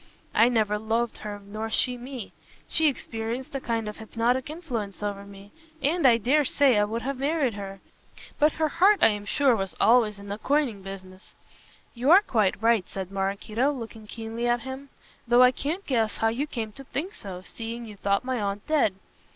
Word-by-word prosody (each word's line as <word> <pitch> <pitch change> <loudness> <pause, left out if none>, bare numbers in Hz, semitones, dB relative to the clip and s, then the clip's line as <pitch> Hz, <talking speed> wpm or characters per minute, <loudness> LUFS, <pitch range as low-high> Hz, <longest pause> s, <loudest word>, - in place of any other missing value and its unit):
I 230 - +5
never 215 -3 +1
loved 225 +2 -1
her 210 -1 -6
nor 215 +2 -5
she 250 +3 +1
me. 245 -2 -8 0.3
She 320 -1 +3
exercised 235 0 -5
a 275 - -3
kind 230 -3 -2
of 210 - -6
hypnotic 235 +4 -1
influence 235 - -5
over 200 -1 -3
me, 200 0 -13 0.3
and 310 +1 +3
I 235 -2 +6
dare 270 +7 +3
say 265 -4 +3
I 205 - +3
would 225 +3 -4
have 275 -1 -3
married 280 -3 +1
her. 195 -1 -7 0.6
But 300 +1 +4
her 315 -1 +1
heart 385 +6 +4
I - - +8
am 205 -1 -3
sure 270 +2 +3
was 195 -5 -3
always 225 -3 +4
in 200 0 -11
the 205 +2 -4
coining 270 -8 0
business." 190 0 -11 0.6
"You 250 +4 -1
are 380 +5 +8
quite 215 - +1
right," 225 -3 +2
said 190 -1 -6
Maraquito, 200 +7 0
looking 225 -5 -8
keenly 225 +2 -4
at 240 0 +2
him, 265 +3 -7 0.4
"though 240 +1 +6
I 250 - +7
can't 315 +9 -3
guess 225 -5 0
how 225 - +2
you 260 +7 -2
came 225 -7 -4
to 275 +6 -11
think 315 +8 -4
so, 185 -2 -8
seeing 230 +3 -6
you 215 -2 -10
thought 200 +3 0
my 255 -3 -1
aunt 200 0 -3
dead. 290 -11 +2
230 Hz, 195 wpm, -26 LUFS, 205-265 Hz, 0.6 s, I